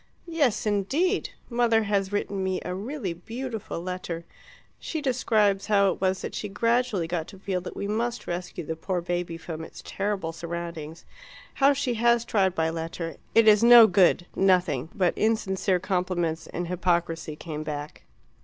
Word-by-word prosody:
"Yes, 295 Hz, -12 st, +1 dB
indeed! 265 Hz, -, +1 dB, 0.2 s
Mother 235 Hz, -2 st, +2 dB
has 200 Hz, -2 st, 0 dB
written 200 Hz, -1 st, -2 dB
me 190 Hz, -1 st, -1 dB
a 180 Hz, -, -3 dB
really 205 Hz, -, -4 dB
beautiful 225 Hz, +3 st, -6 dB
letter. 175 Hz, -1 st, -5 dB, 0.5 s
She 320 Hz, -, -4 dB
describes 215 Hz, -8 st, +1 dB
how 200 Hz, -2 st, +4 dB
it -, -, -7 dB
was 190 Hz, 0 st, 0 dB
that -, -, -5 dB
she 210 Hz, -, -4 dB
gradually 230 Hz, -3 st, +1 dB
got 165 Hz, -1 st, -3 dB
to 195 Hz, -, -12 dB
feel 185 Hz, -1 st, -2 dB
that 180 Hz, -, -8 dB
we 200 Hz, -, -3 dB
must 230 Hz, +3 st, -2 dB
rescue 175 Hz, 0 st, -4 dB
the 160 Hz, -, -3 dB
poor 180 Hz, +3 st, -2 dB
baby 175 Hz, -1 st, -3 dB
from 160 Hz, -1 st, -7 dB
its -, -, -11 dB
terrible 195 Hz, -4 st, -2 dB
surroundings, 170 Hz, -1 st, -6 dB, 0.5 s
how 275 Hz, +1 st, +4 dB
she 265 Hz, -3 st, -1 dB
has 235 Hz, 0 st, +4 dB
tried 190 Hz, -5 st, +1 dB
by 160 Hz, -1 st, +1 dB
letter, 165 Hz, +1 st, -4 dB
and -, -, -13 dB, 0.2 s
it 225 Hz, -1 st, +6 dB
is 210 Hz, +1 st, +6 dB
no 235 Hz, -1 st, +10 dB
good 185 Hz, -3 st, +4 dB
nothing 180 Hz, -7 st, +2 dB
but 180 Hz, -3 st, +2 dB
insincere 190 Hz, -4 st, +1 dB
compliments 180 Hz, -3 st, -1 dB
and 175 Hz, 0 st, -4 dB
hypocrisy 170 Hz, -3 st, -1 dB
came 155 Hz, -1 st, -6 dB
back. 150 Hz, -1 st, -6 dB
190 Hz, 165 wpm, -26 LUFS, 170-220 Hz, 0.5 s, no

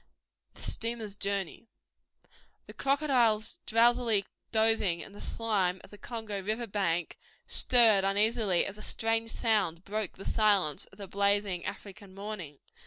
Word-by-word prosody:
The -, -, -12 dB
Steamer's 225 Hz, -3 st, -4 dB
Journey 200 Hz, +1 st, -2 dB, 1.0 s
The -, -, -11 dB
crocodiles 270 Hz, -2 st, +1 dB
drowsily 230 Hz, -2 st, +3 dB, 0.3 s
dosing 220 Hz, -6 st, +2 dB
in 195 Hz, -, -9 dB
the 205 Hz, -, -11 dB
slime 195 Hz, -5 st, 0 dB
of -, -, -14 dB
the 205 Hz, -, -12 dB
Congo 220 Hz, -4 st, -5 dB
river 215 Hz, +5 st, -2 dB
bank 180 Hz, -6 st, -1 dB, 0.3 s
stirred 225 Hz, -6 st, +5 dB
uneasily 205 Hz, -1 st, +2 dB
as 200 Hz, +1 st, -6 dB
a -, -, -9 dB
strange 225 Hz, +1 st, -1 dB
sound 200 Hz, -8 st, 0 dB
broke 210 Hz, -1 st, -3 dB
the 195 Hz, -, -11 dB
silence 200 Hz, -9 st, +2 dB
of 195 Hz, -, -19 dB
the 200 Hz, -2 st, -8 dB
blazing 200 Hz, -2 st, 0 dB
African 200 Hz, -1 st, -8 dB
morning. 195 Hz, -8 st, -6 dB
210 Hz, 135 wpm, -30 LUFS, 195-225 Hz, 1.0 s, stirred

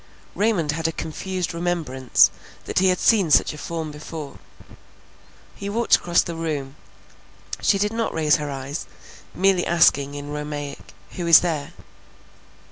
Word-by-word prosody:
Raymond 200 Hz, -8 st, +1 dB
had 160 Hz, +1 st, -1 dB
a -, -, -1 dB
confused 180 Hz, +3 st, -4 dB
remembrance 165 Hz, -7 st, +2 dB, 0.3 s
that -, -, 0 dB
he 190 Hz, -, +3 dB
had 185 Hz, 0 st, +3 dB
seen 200 Hz, -6 st, +3 dB
such 150 Hz, -, +4 dB
a -, -, -9 dB
form 160 Hz, 0 st, -5 dB
before; 150 Hz, -1 st, -8 dB, 1.1 s
he 200 Hz, -, -6 dB
walked 230 Hz, +3 st, +3 dB
across 175 Hz, 0 st, +2 dB
the 170 Hz, -, -5 dB
room; 150 Hz, -5 st, -4 dB, 0.9 s
she 200 Hz, -, +3 dB
did 210 Hz, +2 st, 0 dB
not 230 Hz, 0 st, -1 dB
raise 155 Hz, -2 st, +2 dB
her 150 Hz, -1 st, -5 dB
eyes, 140 Hz, +2 st, -5 dB, 0.5 s
merely 190 Hz, -1 st, +3 dB
asking 145 Hz, -4 st, +3 dB
in 145 Hz, 0 st, -7 dB
Romaic, 150 Hz, -4 st, -6 dB, 0.2 s
who 175 Hz, -2 st, -5 dB
is 165 Hz, -1 st, +8 dB
there? 160 Hz, -2 st, -3 dB
165 Hz, 145 wpm, -23 LUFS, 145-180 Hz, 1.1 s, is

